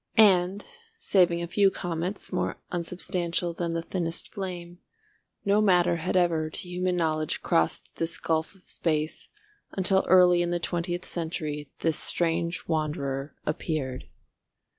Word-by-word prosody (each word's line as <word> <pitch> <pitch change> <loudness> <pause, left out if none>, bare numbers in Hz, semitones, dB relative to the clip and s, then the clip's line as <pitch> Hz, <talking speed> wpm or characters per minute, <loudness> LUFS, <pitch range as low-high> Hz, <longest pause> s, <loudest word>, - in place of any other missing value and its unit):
And, 195 -2 +5 0.3
saving 175 - +3
a - - -3
few 195 +3 +4
comets 175 +2 -4
more 180 - -1
unsubstantial 175 0 -2
than 170 0 -2
the 165 0 -2
thinnest 170 -1 -3
flame, 180 -3 -6 0.7
no 200 +1 +4
matter 180 -4 +4
had 180 +3 0
ever 165 -3 +2
to 175 - -5
human 180 0 -1
knowledge 155 -3 0
crossed 80 - 0
this 165 0 -1
gulf 160 +3 -1
of 190 - -22
space, 155 -2 -2 0.4
until 190 0 +3
early 180 -1 +6
in 175 - 0
the 175 0 0
twentieth 175 +1 -2
century 155 -4 -3
this 160 -2 +1
strange 170 0 0
wanderer 150 -3 -2
appeared. 150 -4 -2
175 Hz, 135 wpm, -27 LUFS, 160-180 Hz, 0.7 s, early